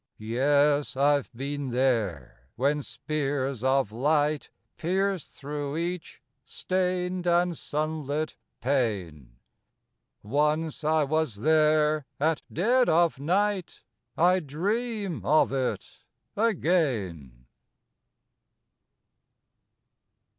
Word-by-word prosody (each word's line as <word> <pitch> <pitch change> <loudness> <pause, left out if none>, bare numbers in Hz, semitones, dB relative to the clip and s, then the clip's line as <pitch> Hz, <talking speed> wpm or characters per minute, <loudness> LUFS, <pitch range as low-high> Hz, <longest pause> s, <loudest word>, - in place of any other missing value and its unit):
Yes, 140 +6 +2
I've 140 -1 +2
been 140 +2 -4
there 110 - -1
when 145 +4 +1
spears 140 -4 -3
of 130 -4 +2
light 145 +5 +1 0.3
Pierced 190 0 -1
thro' 145 +1 -5
each 175 0 -4 0.2
stained 180 +2 -2
and 175 0 +2
sunlit 155 0 -3 0.3
pane; 95 - -2 0.9
Once 150 +7 0
I 155 0 +3
was 155 -4 0
there 155 -1 +3
at 155 +1 +1
dead 245 +8 +3
of 165 -3 +3
night 190 +4 -1 0.3
I 180 +3 +4
dream 200 - -2
of 155 -1 +3
it 130 -2 -3 0.4
again. 125 - 0
150 Hz, 80 wpm, -27 LUFS, 135-170 Hz, 0.9 s, I